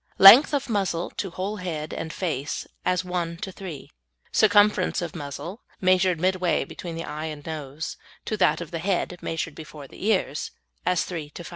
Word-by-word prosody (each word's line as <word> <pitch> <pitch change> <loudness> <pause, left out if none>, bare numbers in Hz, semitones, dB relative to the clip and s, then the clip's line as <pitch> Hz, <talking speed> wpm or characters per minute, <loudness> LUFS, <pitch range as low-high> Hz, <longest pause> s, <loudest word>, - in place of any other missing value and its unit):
Length 225 +9 +10
of 280 - -1
muzzle 195 -6 -1
to 195 - -2
whole 190 +4 -4
head 160 -5 -4
and 160 - -4
face 150 -7 -3 0.2
as 180 0 +1
1 175 -2 -2
to 190 +1 -5
3. 180 -7 -8 0.4
Circumference 205 -3 +4
of 170 -2 -4
muzzle 165 - -6 0.2
(measured 185 -2 +3
midway 185 0 +1
between 170 -2 -7
the 165 - -4
eyes 155 +1 -4
and 145 -1 -12
nose) 155 -1 -5 0.3
to 215 - -1
that 185 - +3
of 170 - -7
the 165 - -3
head 180 -1 -1
(measured 165 -1 -3
before 150 -2 -10
the - - -12
ears) 190 -9 +1 0.4
as 180 -1 +3
3 165 -5 -5
to 175 - -9
5. - - -9
175 Hz, 180 wpm, -25 LUFS, 160-190 Hz, 0.4 s, Length